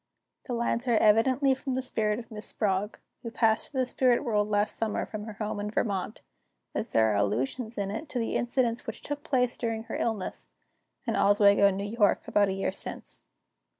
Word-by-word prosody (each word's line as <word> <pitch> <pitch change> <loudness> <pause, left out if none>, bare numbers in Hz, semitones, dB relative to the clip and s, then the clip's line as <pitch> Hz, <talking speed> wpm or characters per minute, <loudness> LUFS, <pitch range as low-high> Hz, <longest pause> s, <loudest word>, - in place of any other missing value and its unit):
The 250 - -3
lines 235 +1 -1
are 235 -2 +4
evidently 255 +6 +4
from 265 0 -3
the 260 - -1
spirit 215 -4 0
of 230 -1 -9
Miss 215 -1 -7
Sprague, 205 0 -1 0.2
who 230 - -5
passed 225 -1 +1
to 275 - -6
the 260 - +2
spirit 250 0 +2
world 210 -4 +1
last 205 0 +2
summer, 220 -2 -1
from 215 -1 -6
her 220 - -7
home 210 0 -4
in 205 0 -3
Vermont, 210 -1 -2 0.5
as 220 - -2
there 110 -1 +4
are - - +1
allusions 135 - -1
in 200 -1 -2
it 285 +9 -5
to 250 - -2
incidents 240 0 -1
which - - -6
took 290 0 -4
place 250 -6 +1
during 225 -2 -2
her - - -6
illness, 195 - -3 0.6
in - - -1
Oswego, 200 0 +5
N. 195 -1 0 0.2
Y., 210 -4 +4
about 205 -1 +2
a - - -1
year 195 - -1
since. - - -4
220 Hz, 195 wpm, -28 LUFS, 205-245 Hz, 0.6 s, Oswego